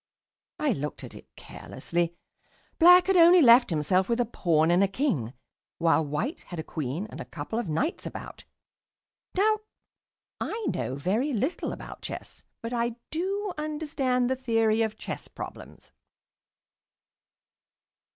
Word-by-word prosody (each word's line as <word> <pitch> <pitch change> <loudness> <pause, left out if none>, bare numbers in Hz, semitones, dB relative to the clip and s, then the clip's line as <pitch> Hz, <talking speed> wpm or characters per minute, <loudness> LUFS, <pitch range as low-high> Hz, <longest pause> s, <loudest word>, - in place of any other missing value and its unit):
I 300 -2 +2
looked 150 - -4
at - - -9
it - - -13
carelessly. 170 0 -4 0.6
Black 360 +2 +8
had 385 - +2
only 350 +1 +8
left 240 -4 +7
himself 180 +4 +1
with 235 +1 +1
a 245 - +3
Pawn 165 -7 +2
and 180 +3 +4
a - - +4
King, 190 - -1 0.4
while 165 -1 +3
White 155 - -3
had 175 - -7
a 160 - -3
Queen 155 +4 -4
and - - -7
a - - -6
couple 225 - -5
of 225 -8 -4
Knights 275 - -1
about. - - -9 0.9
Now, 430 +3 +3 0.8
I 445 -1 -3
know 130 - -3
very 215 - 0
little 260 - -1
about - - -9
chess, - - -8 0.2
but 230 +1 -4
I 235 -1 -1 0.2
do 390 +4 -2
understand 295 -5 -1
the 260 - +1
theory 225 -3 +1
of 220 -1 -1
chess - - -6
problems. - - -10
235 Hz, 140 wpm, -27 LUFS, -, 0.9 s, Black